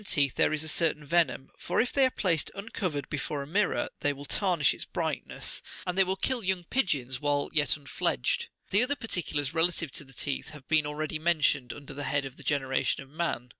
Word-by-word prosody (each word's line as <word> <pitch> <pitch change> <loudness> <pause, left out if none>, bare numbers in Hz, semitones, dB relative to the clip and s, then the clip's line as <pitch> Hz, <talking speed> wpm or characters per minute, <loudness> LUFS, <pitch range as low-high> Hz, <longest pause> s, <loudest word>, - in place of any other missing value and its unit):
Gl - - -13
teeth 140 -3 +3
there - - +3
is 155 0 0
a - - -3
certain 155 -2 +2
venom; 160 -3 +1
for - - -1
if 245 - +2
they 270 -2 +5
are - - -1
placed 175 - 0
uncovered 185 - -3
before 145 -1 -3
a - - -10
mirror, 200 +5 +1
the)' 145 - +1
will 140 +1 -8
tarnish 175 -3 +2
its - - -4
brightness, - - -3 0.2
and 180 - -2
they 195 - +6
will 190 +1 -1
kill 240 +4 0
young 185 -1 0
pigeons 140 - 0
while 145 -1 +1
yet 150 -1 +3
unfledged. 135 - -1 0.2
The 200 - +6
other 265 +4 +2
parti 225 -8 -1
culars 145 -3 -2
relative 170 -2 +2
to - - -4
the 135 -1 -16
teeth 140 +3 -3
have 135 - -18
been 155 -1 +4
already47 155 +1 -3
mentioned 150 -6 +2
under 145 0 -8
the 145 +1 -5
head 140 -1 0
of 135 -1 -7
the - - -10
generation 135 -1 0
of 135 - -19
man. 155 -6 -2
150 Hz, 220 wpm, -29 LUFS, 140-180 Hz, 0.2 s, they